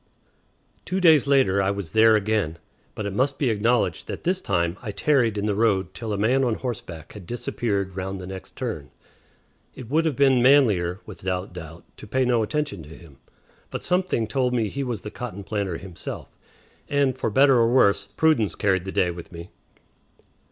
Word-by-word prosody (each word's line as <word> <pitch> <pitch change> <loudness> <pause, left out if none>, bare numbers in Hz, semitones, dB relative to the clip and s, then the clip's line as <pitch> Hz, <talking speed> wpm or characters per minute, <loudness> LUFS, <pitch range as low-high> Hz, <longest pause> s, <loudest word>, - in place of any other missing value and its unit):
Two 185 +1 -2
days 160 -6 +5
later 130 -9 +3
I 95 - +1
was 100 -5 -4
there 110 +2 +6
again, 105 -6 0 0.4
but 110 - -4
it 100 - -3
must 135 +6 0
be 130 -5 +1
acknowledged 115 +3 0
that - - -6
this 185 +2 0
time 85 -3 0
I 115 - -6
tarried 120 -1 +1
in 100 - -1
the 105 - +1
road 100 -3 +1
till 115 -2 -5
a 100 - -1
man 125 +6 +2
on 120 -3 +1
horseback 95 - -6
had 100 -5 -11
disappeared 100 -5 -2
round 95 0 -4
the 90 - -7
next 95 -1 -9
turn. - - -5 0.9
It 125 -1 -10
would 160 +2 +2
have 155 -4 0
been 135 -2 +4
manlier, 110 -9 +4
without 95 -3 -4
doubt, 85 -1 -9
to - - -11
pay 130 +4 +1
no 120 -2 +2
attention 140 - -2
to 75 - -12
him; 80 -3 -14 0.5
but - - -6
something 180 -10 +1
told 125 +2 0
me 115 - +1
that 105 - -2
he 140 - -2
was 120 -6 -3
the 105 - -7
cotton 110 -5 -7
planter 100 -5 -2
himself, 90 -1 -7 0.6
and, 140 -3 +2
for 130 - -2
better 135 +4 +5
or 115 0 +3
worse, 100 -5 +3
prudence 155 -9 +1
carried 95 -3 +1
the 95 - -4
day 90 -2 +1
with 85 +1 -10
me. 85 0 -9
110 Hz, 195 wpm, -24 LUFS, 95-130 Hz, 0.9 s, there